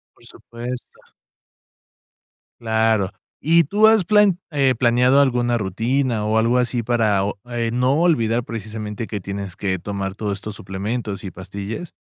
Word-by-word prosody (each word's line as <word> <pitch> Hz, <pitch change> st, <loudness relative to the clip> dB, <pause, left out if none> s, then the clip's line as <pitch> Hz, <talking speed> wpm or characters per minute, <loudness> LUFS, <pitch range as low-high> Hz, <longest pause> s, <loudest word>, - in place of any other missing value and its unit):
Por -, -, -21 dB
supuesto. 120 Hz, +1 st, -8 dB, 1.6 s
Claro, 110 Hz, -3 st, +1 dB, 0.3 s
¿y 165 Hz, +2 st, +4 dB
tú 210 Hz, +8 st, +4 dB
has 220 Hz, -5 st, +4 dB
plan 205 Hz, -2 st, +4 dB
eh, 135 Hz, -3 st, +2 dB
planeado 125 Hz, +3 st, +4 dB
alguna 120 Hz, -3 st, +2 dB
rutina 115 Hz, +4 st, -1 dB
o 110 Hz, +1 st, +1 dB
algo 120 Hz, +3 st, +3 dB
así 120 Hz, -1 st, 0 dB
para 110 Hz, -5 st, +2 dB
o 100 Hz, 0 st, -3 dB
eh, 115 Hz, -1 st, -1 dB
no 125 Hz, +3 st, +2 dB
olvidar, 120 Hz, -9 st, +2 dB
precisamente, 110 Hz, -1 st, -5 dB
que 105 Hz, -2 st, -4 dB
tienes 100 Hz, -1 st, -6 dB
que 95 Hz, -2 st, -1 dB
tomar 100 Hz, +1 st, -4 dB
todos 105 Hz, -2 st, -3 dB
estos 105 Hz, 0 st, -6 dB
suplementos 100 Hz, +2 st, -4 dB
y 95 Hz, -, -5 dB
pastillas? 100 Hz, -, -6 dB
115 Hz, 145 wpm, -21 LUFS, 100-125 Hz, 1.6 s, y